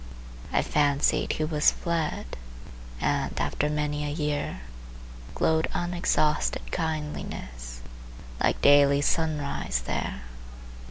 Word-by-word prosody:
I -, -, +2 dB
fancied 145 Hz, -1 st, +2 dB
he 155 Hz, -, -1 dB
was 155 Hz, 0 st, +4 dB
fled, 165 Hz, -, -2 dB, 0.6 s
And, -, -, 0 dB
after 150 Hz, -, 0 dB
many 150 Hz, 0 st, -1 dB
a 145 Hz, -, -2 dB
year, 145 Hz, -, -2 dB, 0.7 s
Glowed 160 Hz, 0 st, +2 dB
unexhausted 175 Hz, -3 st, 0 dB
kindliness 65 Hz, -, -4 dB, 0.6 s
Like -, -, +2 dB
daily 140 Hz, 0 st, +6 dB
sunrise 145 Hz, -, 0 dB
there. 65 Hz, +1 st, -3 dB
150 Hz, 95 wpm, -27 LUFS, 140-155 Hz, 0.7 s, daily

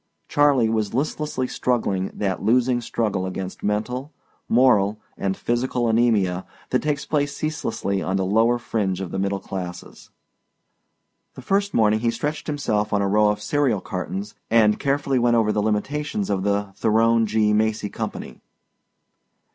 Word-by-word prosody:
Charley 145 Hz, -5 st, +3 dB
was 110 Hz, -2 st, -1 dB
listlessly 150 Hz, -1 st, -1 dB
struggling 100 Hz, -8 st, -1 dB
that 95 Hz, -3 st, -2 dB
losing 120 Hz, +3 st, +2 dB
struggle 105 Hz, -5 st, -1 dB
against 95 Hz, 0 st, -6 dB
mental, 125 Hz, +7 st, -2 dB, 0.4 s
moral, 110 Hz, -4 st, +4 dB, 0.2 s
and 95 Hz, -1 st, -2 dB
physical 120 Hz, +1 st, -1 dB
anæmia 110 Hz, -6 st, +2 dB, 0.3 s
that 125 Hz, -, +2 dB
takes 150 Hz, -1 st, -1 dB
place 145 Hz, -1 st, -1 dB
ceaselessly 100 Hz, -10 st, -2 dB
on 95 Hz, -, -1 dB
the 95 Hz, -, 0 dB
lower 115 Hz, +5 st, +3 dB
fringe 100 Hz, -6 st, -2 dB
of 95 Hz, -3 st, -5 dB
the 95 Hz, -, -3 dB
middle 100 Hz, 0 st, 0 dB
classes. 90 Hz, -2 st, -7 dB, 1.3 s
The 130 Hz, -, -10 dB
first 200 Hz, +5 st, 0 dB
morning 110 Hz, -1 st, +3 dB
he 115 Hz, +1 st, +1 dB
stretched 145 Hz, +6 st, -3 dB
himself 105 Hz, -8 st, -1 dB
on 100 Hz, -1 st, +2 dB
a -, -, +1 dB
row 105 Hz, +1 st, +4 dB
of 105 Hz, 0 st, -2 dB
cereal 130 Hz, -2 st, +1 dB
cartons 95 Hz, +3 st, -5 dB, 0.2 s
and 110 Hz, -2 st, +4 dB
carefully 140 Hz, -1 st, +1 dB
went 120 Hz, 0 st, +3 dB
over 110 Hz, -2 st, +3 dB
the 105 Hz, -, 0 dB
limitations 110 Hz, +1 st, -1 dB
of 95 Hz, -2 st, 0 dB
the 100 Hz, 0 st, -1 dB
Theron 115 Hz, +1 st, +3 dB
G. 105 Hz, 0 st, +2 dB
Macy 110 Hz, -1 st, +1 dB
Company. -, -, -6 dB
110 Hz, 150 wpm, -23 LUFS, 100-125 Hz, 1.3 s, moral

